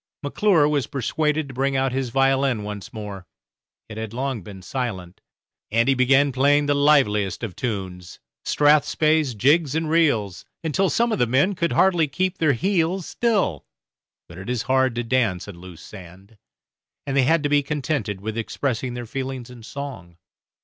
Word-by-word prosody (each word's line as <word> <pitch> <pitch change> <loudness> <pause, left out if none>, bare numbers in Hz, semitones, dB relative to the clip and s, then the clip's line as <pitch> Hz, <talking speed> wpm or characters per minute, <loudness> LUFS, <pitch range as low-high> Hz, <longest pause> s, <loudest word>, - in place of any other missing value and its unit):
McClure 160 +1 +3
was 145 -5 0
persuaded 150 +3 -1
to 130 - -10
bring 135 +1 0
out 135 0 +1
his 130 -1 -2
violin 135 -2 +1
once 105 -1 -7
more 100 -4 -8 0.6
it 110 - -9
had 110 -1 -4
been 115 - -10
long 110 -8 -4
silent 95 -6 -5 0.5
and 115 +3 +2
he 135 - +4
began 135 +2 +3
playing 145 +3 +3
the 145 - +2
liveliest 135 -10 +2
of 105 -6 -5
tunes, 95 -7 -5 0.2
strathspeys, 150 -1 +2
jigs, 145 +5 +3
and 160 -1 -1
reels, 115 - +1 0.2
until 180 +4 +1
some 235 0 +1
of - - -1
the 120 - +3
men 140 - +2
could 170 -2 -1
hardly 175 -5 +3
keep 185 +6 -2
their 155 -3 +3
heels 180 - 0
still, 210 - -1 0.6
but 85 +1 -11
it 95 - -8
is 125 -2 -1
hard 130 -1 +1
to 120 - -2
dance 115 -7 0
on 95 -4 -10
loose 90 -2 -12
sand, 95 +2 -13 0.7
and 135 -1 -3
they 135 - +5
had 155 +4 +2
to 145 - 0
be 145 0 +3
contented 140 -8 -3
with 110 +1 -4
expressing 125 +1 -3
their 120 -1 -5
feelings 130 0 -5
in 120 -2 -12
song. 110 -10 -8
130 Hz, 170 wpm, -23 LUFS, 110-145 Hz, 0.7 s, they